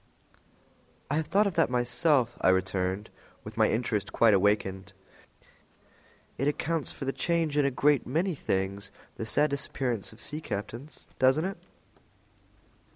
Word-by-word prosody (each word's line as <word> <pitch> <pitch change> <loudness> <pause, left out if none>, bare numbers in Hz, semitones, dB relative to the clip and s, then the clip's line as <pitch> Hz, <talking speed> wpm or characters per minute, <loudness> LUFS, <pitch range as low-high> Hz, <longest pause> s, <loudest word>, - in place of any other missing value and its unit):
"I 150 - +1
have 160 -1 -1
thought 205 +2 +3
of 200 - 0
that - - +2
myself," 125 +2 +2
I - - +4
returned, 95 +2 0 0.3
with 105 0 -9
my 110 -1 +3
interest 110 -3 -1
quite 115 -2 +4
awakened. 100 0 +1 1.5
"It 135 - +1
accounts 155 +1 -1
for 135 - -7
the 135 - -1
change 165 -3 0
in 145 -1 +3
a - - +3
great 140 +1 +2
many 170 +8 0
things, 100 -6 -2 0.3
the 110 - -4
sad 145 +6 +2
disappearance 130 -5 -2
of - - -16
sea 150 +1 -5
captains, 115 +6 -6
doesn't 130 +6 +4
it?" 195 +1 -4
125 Hz, 145 wpm, -28 LUFS, 105-150 Hz, 1.5 s, I